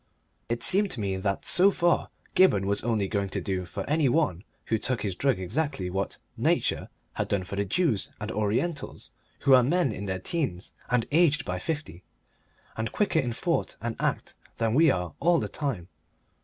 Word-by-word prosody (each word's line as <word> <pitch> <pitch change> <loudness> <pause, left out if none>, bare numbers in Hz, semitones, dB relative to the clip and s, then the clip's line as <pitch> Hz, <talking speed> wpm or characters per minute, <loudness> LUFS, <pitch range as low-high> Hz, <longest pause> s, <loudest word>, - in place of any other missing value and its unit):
It 120 0 -1
seemed 200 +2 +3
to 130 - -1
me 100 -2 -1
that 100 0 -2
so 190 +2 +7
far 175 -3 +1 0.2
Gibberne 105 - +4
was 100 +1 0
only 110 -4 0
going 100 -1 -1
to - - -3
do 95 -2 -2
for - - -6
any 150 -2 +2
one 125 - +1 0.2
who 110 - 0
took 125 +2 -1
his 100 -3 -1
drug 130 +1 +1
exactly 95 - -2
what 95 +1 -2 0.2
Nature - - 0 0.2
has - - -2
done 100 -2 0
for 100 +2 -6
the 100 +1 0
Jews 120 - +1
and - - -4
Orientals, 110 - -2 0.3
who 135 - +5
are 130 - +8
men 160 +2 +2
in 100 -1 -5
their 95 -1 -1
teens 95 - -3 0.2
and 125 -2 +2
aged 155 -3 +3
by 90 0 -3
fifty, 145 - -5 0.7
and 110 0 -3
quicker 200 -6 +1
in 125 -5 -1
thought 165 +8 -1
and 115 -1 -3
act - - -1 0.2
than 115 -1 0
we 160 +4 +5
are 90 - -1
all 170 0 +3
the - - -2
time. 125 - -3
115 Hz, 190 wpm, -27 LUFS, 100-155 Hz, 0.7 s, are